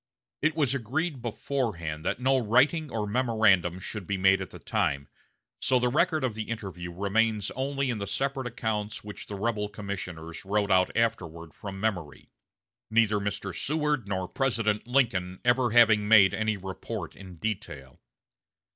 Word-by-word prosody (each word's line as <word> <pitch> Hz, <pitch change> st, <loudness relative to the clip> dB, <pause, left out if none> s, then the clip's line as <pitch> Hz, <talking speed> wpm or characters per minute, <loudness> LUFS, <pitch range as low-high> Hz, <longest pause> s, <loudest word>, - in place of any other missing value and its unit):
It 155 Hz, +1 st, +2 dB
was 145 Hz, -5 st, +2 dB
agreed 140 Hz, +4 st, -2 dB
beforehand 105 Hz, -, -3 dB
that -, -, -1 dB
no 130 Hz, +1 st, +3 dB
writing 135 Hz, +7 st, +3 dB
or 110 Hz, -3 st, -2 dB
memorandum 105 Hz, -6 st, +2 dB
should 95 Hz, 0 st, -6 dB
be 100 Hz, -, -1 dB
made 95 Hz, 0 st, +4 dB
at 95 Hz, -, -5 dB
the -, -, -10 dB
time, 80 Hz, -, -1 dB, 0.5 s
so 130 Hz, -, +3 dB
the 125 Hz, 0 st, +2 dB
record 155 Hz, +2 st, +2 dB
of 125 Hz, -4 st, 0 dB
the 110 Hz, +1 st, -5 dB
interview 95 Hz, -6 st, -5 dB
remains 105 Hz, +3 st, +1 dB
only 135 Hz, 0 st, -1 dB
in 115 Hz, -, -3 dB
the 100 Hz, -, -4 dB
separate 135 Hz, +1 st, -1 dB
accounts 110 Hz, -2 st, -3 dB
which 105 Hz, 0 st, -8 dB
the 105 Hz, -, -5 dB
rebel 105 Hz, 0 st, -1 dB
commissioners 95 Hz, -6 st, -6 dB
wrote 100 Hz, +1 st, 0 dB
out 95 Hz, 0 st, +4 dB
afterward 85 Hz, -8 st, -1 dB
from 95 Hz, +4 st, -7 dB
memory, 90 Hz, -9 st, -3 dB, 0.6 s
neither 110 Hz, -2 st, +3 dB
Mr. 100 Hz, -2 st, -3 dB
Seward 150 Hz, -6 st, -1 dB
nor 95 Hz, -2 st, -2 dB
President 115 Hz, -4 st, 0 dB
Lincoln 105 Hz, -9 st, +1 dB
ever 120 Hz, 0 st, +3 dB
having 110 Hz, -2 st, +5 dB
made 105 Hz, -3 st, +7 dB
any 110 Hz, -1 st, 0 dB
report 95 Hz, 0 st, -6 dB
in 95 Hz, -2 st, -11 dB
detail. 80 Hz, -, -5 dB
105 Hz, 155 wpm, -28 LUFS, 95-120 Hz, 0.6 s, made